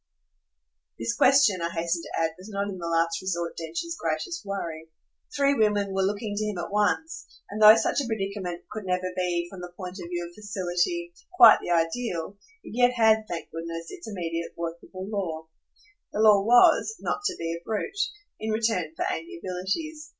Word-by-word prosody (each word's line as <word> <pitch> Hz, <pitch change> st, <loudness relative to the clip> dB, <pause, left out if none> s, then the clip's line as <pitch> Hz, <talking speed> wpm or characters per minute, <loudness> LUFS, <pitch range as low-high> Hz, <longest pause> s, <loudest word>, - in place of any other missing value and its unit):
This 115 Hz, 0 st, -1 dB
question, 255 Hz, -9 st, +5 dB
I 170 Hz, -, -1 dB
hasten 170 Hz, 0 st, -1 dB
to -, -, -5 dB
add, 165 Hz, 0 st, +1 dB
was 185 Hz, +4 st, -12 dB
not 200 Hz, -1 st, -2 dB
in 190 Hz, -2 st, -6 dB
the 170 Hz, -, -4 dB
last 165 Hz, 0 st, +1 dB
resort 175 Hz, -3 st, -2 dB
Densher's 170 Hz, -, -4 dB
greatest 350 Hz, -3 st, -2 dB
worry. 165 Hz, -5 st, -5 dB, 0.5 s
Three 280 Hz, -1 st, +3 dB
women 210 Hz, -5 st, +1 dB
were 195 Hz, -, +1 dB
looking 205 Hz, +2 st, -1 dB
to 210 Hz, -, -1 dB
him 210 Hz, -3 st, -3 dB
at 175 Hz, -, -5 dB
once, 320 Hz, +11 st, 0 dB, 0.2 s
and, 210 Hz, +1 st, -4 dB
though 215 Hz, +1 st, +11 dB
such 225 Hz, +5 st, +1 dB
a 270 Hz, -, -4 dB
predicament 195 Hz, -5 st, -3 dB
could 215 Hz, -2 st, -6 dB
never 185 Hz, 0 st, -1 dB
be, 175 Hz, -1 st, 0 dB
from 190 Hz, -2 st, -9 dB
the 180 Hz, 0 st, -8 dB
point 185 Hz, 0 st, -7 dB
of 170 Hz, -, -7 dB
view 175 Hz, -1 st, -3 dB
of 175 Hz, -, -15 dB
facility, 205 Hz, -, -2 dB, 0.2 s
quite 235 Hz, -10 st, +9 dB
the -, -, -6 dB
ideal, 170 Hz, +2 st, -1 dB, 0.3 s
it -, -, -10 dB
yet 245 Hz, 0 st, +4 dB
had, 220 Hz, -2 st, +4 dB
thank 170 Hz, -1 st, -5 dB
goodness, 165 Hz, 0 st, -6 dB
its 225 Hz, -, -9 dB
immediate 170 Hz, -5 st, -4 dB
workable 170 Hz, +3 st, -6 dB
law. 175 Hz, -7 st, -3 dB, 0.7 s
The -, -, -4 dB
law 210 Hz, -2 st, +6 dB
was 245 Hz, -, +5 dB
not -, -, -2 dB
to 375 Hz, -, -2 dB
be 165 Hz, 0 st, -3 dB
a 170 Hz, -, -6 dB
brute 225 Hz, -, -3 dB, 0.4 s
in 220 Hz, -, -3 dB
return 215 Hz, -8 st, 0 dB
for -, -, -2 dB
amiabilities. 190 Hz, -, -4 dB
195 Hz, 185 wpm, -26 LUFS, 170-220 Hz, 0.7 s, though